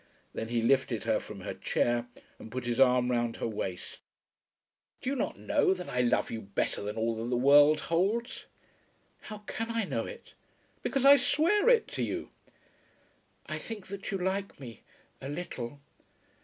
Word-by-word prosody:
Then 110 - -4
he 115 0 0
lifted 130 +1 +2
her - - +1
from - - -9
her - - -4
chair, 120 0 0 0.3
and 110 - -10
put 130 +1 -4
his 120 +1 -1
arm 125 -1 +4
round 120 -1 0
her - - -3
waist. 95 -4 -5 1.0
"Do 260 - -2
you - - -1
not 255 - -2
know 290 -10 +2
that 180 -1 -7
I 125 - +1
love 120 - +1
you 115 - -4
better 100 -1 -2
than 105 +1 -4
all 115 0 0
that 115 +2 -3
the 125 - +1
world 145 +4 +6
holds?" 205 +9 -1 0.7
"How 210 -1 -9
can 225 +2 -4
I 230 -1 0
know - - -2
it?" - - -11 0.5
"Because 275 -2 0
I 280 +1 +10
swear 400 - +3
it 475 -3 +4
to - - -4
you." - - -3 1.1
"I - - -4
think 220 -4 -7
that 200 0 -6
you 195 - -1
like 190 0 -2
me 120 -5 -10 0.4
a 135 - -6
little. 145 -5 -5
140 Hz, 175 wpm, -30 LUFS, -, 1.1 s, I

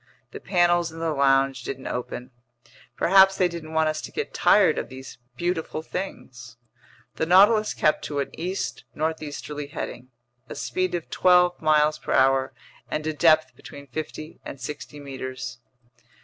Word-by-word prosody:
The - - -8
panels 175 -2 +2
in 165 - -11
the 165 -1 -1
lounge 135 -2 +2
didn't 135 +1 -6
open. 125 0 -5 0.7
Perhaps 190 +1 +5
they 185 - +3
didn't 165 -2 -8
want 160 0 +2
us 155 0 -2
to - - -8
get 445 - -4
tired 185 -7 +4
of - - -6
these 130 -1 -10 0.2
beautiful 170 -2 -2
things. 120 -11 -7 0.6
The 160 - 0
Nautilus 210 +4 +5
kept 155 - +2
to 145 - -4
an 140 - -3
east 180 +4 -4
northeasterly 150 -2 -4
heading, 130 -4 -7 0.4
a - - -6
speed 185 -1 -2
of 170 - -6
twelve 180 -1 +4
miles 155 -1 +3
per - - -3
hour, 130 0 +3 0.4
and 155 - -3
a 155 - -1
depth 155 0 +3
between 140 - -12
fifty 155 +3 -7
and 135 - -8
sixty 145 +2 -7
meters. 130 -3 -7
155 Hz, 155 wpm, -25 LUFS, 135-175 Hz, 0.7 s, Perhaps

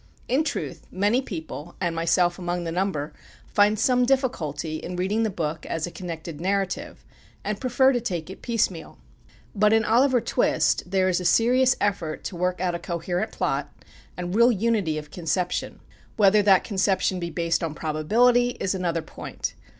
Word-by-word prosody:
In 270 +5 +2
truth, - - -4
many 205 +7 +1
people, 165 - -7
and 175 -3 -1
myself 175 +2 +2
among 175 0 -2
the 165 - -3
number, 165 -5 -2 0.3
find 210 +1 +3
some 250 +3 +3
difficulty 170 - -1
in 180 +3 -6
reading 190 +5 0
the 220 - +1
book 160 -4 -3
as 165 -1 -2
a 175 - -7
connected 165 -3 -7
narrative, 195 0 -2 0.4
and 210 -1 -3
prefer 260 +1 +4
to 245 - 0
take 175 -9 -3
it 190 - -10
piecemeal. 210 -8 -2 0.6
But 210 +1 +3
in 225 0 +3
"Oliver 250 +3 +4
Twist" 180 - +1
there 190 0 +2
is 185 -1 +1
a - - -4
serious 250 +6 +4
effort 195 -6 -1
to 185 - -5
work 180 +1 -1
out 180 -1 0
a 170 - -3
coherent 175 +4 -3
plot, - - -2 0.5
and 180 0 -4
real 235 +3 +5
unity 210 -7 0
of 150 -1 -7
conception. 175 +1 -2 0.4
Whether 210 0 +5
that 195 -2 +5
conception 190 -2 0
be 170 -1 -3
based 170 +1 -1
on 160 -2 -3
probability, 235 +12 +2
is 190 - 0
another 170 -3 -1
point. - - -6
185 Hz, 170 wpm, -25 LUFS, 170-220 Hz, 0.6 s, real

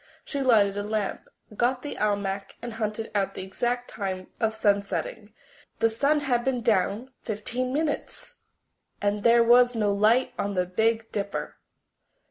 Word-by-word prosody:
She 280 - -3
lighted 210 -6 +4
a - - 0
lamp, 210 -1 -3 0.3
got 250 +3 +1
the 290 - -5
almanac, 200 -2 -1
and 240 -1 -6
hunted 220 0 -3
out 200 -2 0
the - - -5
exact 240 +6 -2
time 190 -2 -5
of 220 -1 0
sunsetting. 205 +1 -1 0.5
The 225 - +2
sun 285 +6 +2
had 245 -4 +1
been 255 -2 0
down 215 +4 +1
fifteen 240 +4 -3
minutes! 300 +2 -3 0.6
And 205 0 0
there 235 +1 +5
was 245 +1 +5
no 210 -2 +1
light 220 +5 +3
on 200 0 -1
the 180 0 +1
Big 225 +5 0
Dipper! 200 -1 -4
220 Hz, 150 wpm, -26 LUFS, 200-245 Hz, 0.6 s, there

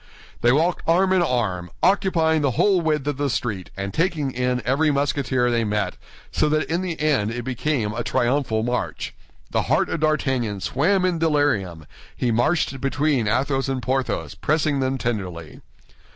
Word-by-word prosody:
They 120 - +4
walked 165 +6 +2
arm 185 +3 +3
in 185 - +3
arm, 105 - -1
occupying 170 -5 +3
the 140 - +2
whole 195 -4 +4
width 155 -4 0
of 145 -2 -2
the 145 0 0
street 105 -7 -3
and 100 0 -4
taking 160 - 0
in 125 -1 -1
every 140 +5 +2
Musketeer 140 -3 +1
they 115 -1 +1
met, 105 -1 -1 0.4
so 150 - +1
that 155 +1 +1
in 170 +2 -1
the 175 -3 -4
end 145 -9 +1
it 120 +1 -4
became 125 -3 -1
a 120 +1 -3
triumphal 120 -3 0
march. 120 +1 -3 0.4
The - - +1
heart - - +2
of - - -2
D'Artagnan 135 -9 0
swam 180 - +1
in 175 -3 0
delirium; 145 - 0 0.3
he 125 - 0
marched 135 +3 +1
between 140 -4 +1
Athos 135 +4 0
and 135 -1 -1
Porthos, 130 +1 -2
pressing 150 -2 0
them 130 0 0
tenderly. 95 - -4
135 Hz, 165 wpm, -23 LUFS, 120-155 Hz, 0.4 s, They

